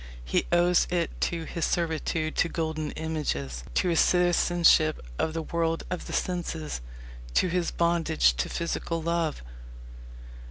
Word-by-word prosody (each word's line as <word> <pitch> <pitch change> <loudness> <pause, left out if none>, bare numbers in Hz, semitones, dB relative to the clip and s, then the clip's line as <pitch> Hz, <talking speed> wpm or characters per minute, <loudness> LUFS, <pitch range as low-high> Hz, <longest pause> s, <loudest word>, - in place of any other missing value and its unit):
He - - 0
owes 175 0 +4
it 175 -2 0 0.2
to 170 -1 -4
his 165 +1 -4
servitude 160 -1 -1
to 170 - +2
golden 160 -2 -2
images, 70 - -3
to 180 - +2
his 165 - +2
citizenship 175 -3 +4 0.2
of 160 - 0
the 165 - -2
world 165 0 -1
of 180 - -4
the - - -6
senses, 165 - -2 0.5
to 185 - +3
his 175 0 0
bondage 165 - +2
to 60 - -1
physical 170 0 -2
love. 165 - -1
165 Hz, 135 wpm, -27 LUFS, 155-170 Hz, 0.5 s, owes